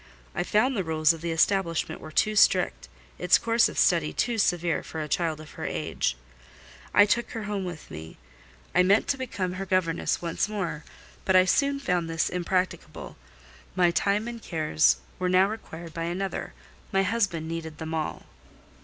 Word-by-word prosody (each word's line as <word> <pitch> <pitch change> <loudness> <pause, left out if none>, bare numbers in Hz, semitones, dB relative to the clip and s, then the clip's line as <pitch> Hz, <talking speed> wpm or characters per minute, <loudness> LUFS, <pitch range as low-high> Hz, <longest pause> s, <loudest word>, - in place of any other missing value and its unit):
I - - -1
found 215 +8 +2
the 195 - 0
rules 160 -1 +3
of 165 - -9
the 170 - -3
establishment 170 +1 +1
were 155 - -9
too 215 +7 +2
strict, - - +3 0.3
its - - +5
course 230 0 +3
of - - -9
study 165 -4 +3
too 235 -2 0
severe 175 -4 +1
for 160 - -7
a 155 - -3
child 165 -1 -1
of 155 0 -11
her - - -8
age: 65 - -2 0.7
I 205 - +7
took 235 +3 0
her 225 - -4
home 205 -2 -3
with 175 -3 -8
me. 80 +1 -9 0.6
I 180 - +5
meant 195 +4 +4
to 275 - +1
become 200 -8 -3
her 195 +1 -4
governess 180 -3 +1
once 170 +4 -1
more, 180 -7 -3 0.4
but 190 - +2
I 185 0 +7
soon 280 +8 +2
found 175 -9 -1
this 165 0 0
impracticable; 180 +1 -2 0.6
my 180 -2 +4
time 200 +5 +1
and 235 -1 -6
cares 155 -4 +2 0.2
were 180 0 0
now 185 +1 +5
required 170 -6 -8
by 165 +1 -3
another—my 195 +1 -3
husband 190 -6 0
needed 160 -1 -5
them 160 0 -5
all. 160 -1 -3
180 Hz, 175 wpm, -27 LUFS, 165-200 Hz, 0.7 s, I